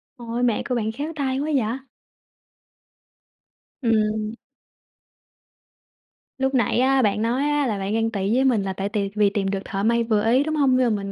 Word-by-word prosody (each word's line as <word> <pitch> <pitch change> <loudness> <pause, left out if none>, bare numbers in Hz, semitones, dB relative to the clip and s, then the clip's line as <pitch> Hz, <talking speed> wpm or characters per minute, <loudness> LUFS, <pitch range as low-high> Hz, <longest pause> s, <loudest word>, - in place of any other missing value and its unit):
Ôi, 240 -1 -4
mẹ 235 -3 +1
của 250 - 0
bạn 220 -2 -1
khéo 290 +7 -5
tay 270 -2 -1
quá 300 +2 -2
vậy! 240 0 0 2.0
Ừm. 215 -2 0 2.0
Lúc 265 0 0
nãy 240 -1 +2
á 265 +1 +3
bạn 210 -2 +1
nói 240 +4 0
á 295 -2 +1
là 210 -4 -2
bạn 195 +2 -2
ghen 225 0 +1
tị 200 +2 0
với 260 - +3
mình 230 -7 +2
là 190 - -3
tại 195 +1 -3
tìm 200 -1 -2
vì 210 -1 +4
tìm 200 -1 -2
được 195 - -1
thợ 195 -1 -3
may 235 +1 +2
vừa 215 -2 +1
ý, 260 +3 +4
đúng 310 +1 -2
hông? 270 -3 +3
Nhưng 240 -4 +2
mà 200 - -4
mình 195 - -5
230 Hz, 195 wpm, -23 LUFS, 210-260 Hz, 2.0 s, vì